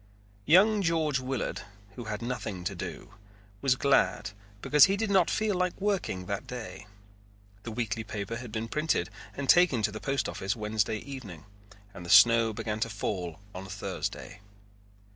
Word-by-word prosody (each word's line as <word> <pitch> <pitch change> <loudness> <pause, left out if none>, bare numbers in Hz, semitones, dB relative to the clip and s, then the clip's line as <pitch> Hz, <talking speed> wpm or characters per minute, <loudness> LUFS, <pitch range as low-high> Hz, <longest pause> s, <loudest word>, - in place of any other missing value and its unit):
Young 200 +7 +6
George 160 -5 +1
Willard, 130 -5 -3 0.3
who 120 +3 -8
had 105 +1 -4
nothing 110 -7 -4
to 100 +3 -2
do, 90 - -7 0.5
was 135 -2 +3
glad 135 -8 +2 0.3
because 150 -1 +7
he 195 +1 0
did 215 0 -1
not 190 -3 +4
feel 215 -1 0
like 180 -1 -1
working 195 - -1
that 100 +2 -4
day. 105 -5 -7 0.7
The 115 - -7
weekly 110 -1 -2
paper 110 +1 -5
had 120 -2 -8
been 110 +1 -3
printed 150 - 0 0.2
and 140 - -4
taken 155 -8 +5
to 105 - +1
the 110 - -6
post 140 0 -1
office 95 +4 -3
Wednesday 110 -1 -1
evening 105 - -9 0.5
and 85 - -9
the 85 - -9
snow 115 +1 +7
began 105 0 -4
to 115 - -1
fall 95 -5 -4
on 95 +1 -7
Thursday. 100 +1 -5
115 Hz, 160 wpm, -29 LUFS, 105-145 Hz, 0.7 s, because